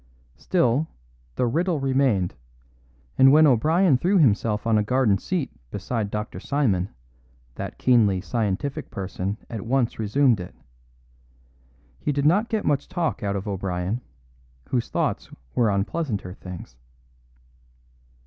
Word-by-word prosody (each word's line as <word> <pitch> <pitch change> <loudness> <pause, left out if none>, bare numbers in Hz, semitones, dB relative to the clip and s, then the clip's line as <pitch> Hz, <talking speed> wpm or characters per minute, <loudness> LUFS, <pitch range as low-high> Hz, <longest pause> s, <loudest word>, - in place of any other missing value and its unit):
Still, 155 -4 +1 0.5
the - - +1
riddle 165 +6 0
remained; 130 -9 +1 0.9
and 135 0 +8
when 155 +2 +7
O'Brien 150 - +4
threw 190 +6 +2
himself 110 - +2
on 110 -2 +3
a - - +1
garden 110 -3 +2
seat 170 - -2 0.2
beside 105 - -3
Dr. 105 +1 -4
Simon, 110 -11 0 0.6
that - - -6
keenly 110 -7 +3
scientific 115 +6 -2
person 95 +1 -4
at 115 -3 -5
once 120 +1 0
resumed 115 +2 +3
it. 90 - -8 1.4
He 150 - -1
did 140 0 -1
not 200 +9 +3
get 220 -1 -1
much 145 -1 +1
talk 175 -3 -2
out 100 -2 -1
of 100 +2 -4
O'Brien, 95 +2 -2 0.7
whose 125 -3 -1
thoughts - - -1 0.2
were 115 -3 +3
on 100 -1 +1
pleasanter 105 - -3
things. 90 -10 -10
120 Hz, 130 wpm, -24 LUFS, 100-145 Hz, 1.4 s, and